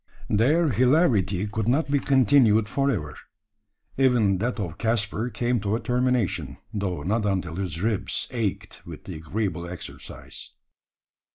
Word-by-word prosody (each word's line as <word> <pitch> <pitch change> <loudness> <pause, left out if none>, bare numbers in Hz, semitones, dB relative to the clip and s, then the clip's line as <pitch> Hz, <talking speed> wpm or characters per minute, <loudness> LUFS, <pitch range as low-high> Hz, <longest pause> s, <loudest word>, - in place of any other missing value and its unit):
Their 150 +10 +3
hilarity 120 - +2
could 110 0 -3
not 140 +4 +1
be 145 - +3
continued 125 -5 +4
for 140 +4 0
ever. 80 - -2 0.8
Even 115 -8 +3
that 120 +3 -2
of 85 -5 -5
Caspar 110 0 0
came 120 0 0
to 100 +1 -1
a - - -1
termination; 125 - 0 0.2
though 95 -7 -2
not 105 +6 0
until 90 -4 -2
his 90 -4 -3
ribs 110 -3 -1
ached 115 -6 -3
with - - -10
the - - -7
agreeable 85 +1 -3
exercise. 90 - -9
110 Hz, 140 wpm, -25 LUFS, 95-125 Hz, 0.8 s, continued